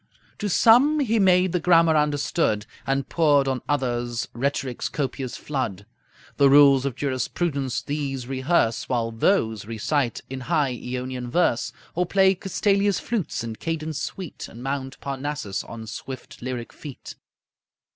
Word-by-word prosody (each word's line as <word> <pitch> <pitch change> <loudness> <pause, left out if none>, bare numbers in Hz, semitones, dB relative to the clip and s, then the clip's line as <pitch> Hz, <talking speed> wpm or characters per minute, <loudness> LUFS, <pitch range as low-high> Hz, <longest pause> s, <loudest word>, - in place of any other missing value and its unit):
To 205 - -1
some 250 +10 +5
he 230 -4 +2
made 185 -2 +4
the 180 - +1
grammar 165 -1 +5
understood, 145 -7 +1 0.2
And 135 0 0
poured 145 -4 +3
on 130 -2 -1
others 120 -5 -1
rhetoric's 130 0 -2
copious 135 -3 -3
flood. 115 -9 -3 0.5
The 140 -1 +6
rules 140 -1 +6
of 130 - -4
jurisprudence 140 0 -2
these 140 -3 -3
rehearse, 130 -2 0
While 115 -2 0
those 110 - +1
recite 115 +3 -1
in 130 0 -6
high 130 +1 0
Eonian 125 0 -5
verse, 135 -4 +1 0.2
Or 180 +1 0
play 190 0 +4
Castalia's 200 +1 +1
flutes 215 - -2
in 115 -1 -5
cadence 160 -3 -3
sweet 180 0 -6
And 120 +2 -11
mount 135 -1 -4
Parnassus 135 -7 -3
on 115 -1 -8
swift 130 +3 -8
lyric 125 -1 -5
feet. 145 -4 -9
140 Hz, 135 wpm, -24 LUFS, 125-165 Hz, 0.5 s, The